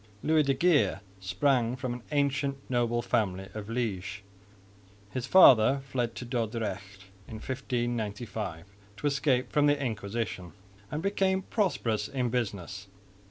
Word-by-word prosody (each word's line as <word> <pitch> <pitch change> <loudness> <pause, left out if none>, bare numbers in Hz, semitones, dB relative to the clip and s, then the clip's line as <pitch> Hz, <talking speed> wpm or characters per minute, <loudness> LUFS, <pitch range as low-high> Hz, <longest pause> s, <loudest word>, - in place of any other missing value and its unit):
Louis 155 0 +4
de 135 -2 +1
Geer 155 - +3 0.2
sprang 120 +5 +1
from 130 -1 -3
an 120 - -7
ancient 140 -1 +1
noble 120 -1 +1
family 95 -4 0
of 105 -2 -6
Liège. 105 -4 -3 0.9
His 130 -1 -3
father 135 -6 +7
fled 120 -3 -2
to 125 - -6
Dordrecht 105 -5 -3 0.2
in 110 - -8
1595 110 -7 -3 0.3
to - - -6
escape 140 -3 +1
from 145 0 +3
the 145 0 +3
Inquisition 110 -6 -3 0.4
and 150 +3 -4
became 190 -1 +1
prosperous 115 - 0
in 125 -3 -1
business. 100 -5 -3
120 Hz, 125 wpm, -29 LUFS, 105-140 Hz, 0.9 s, father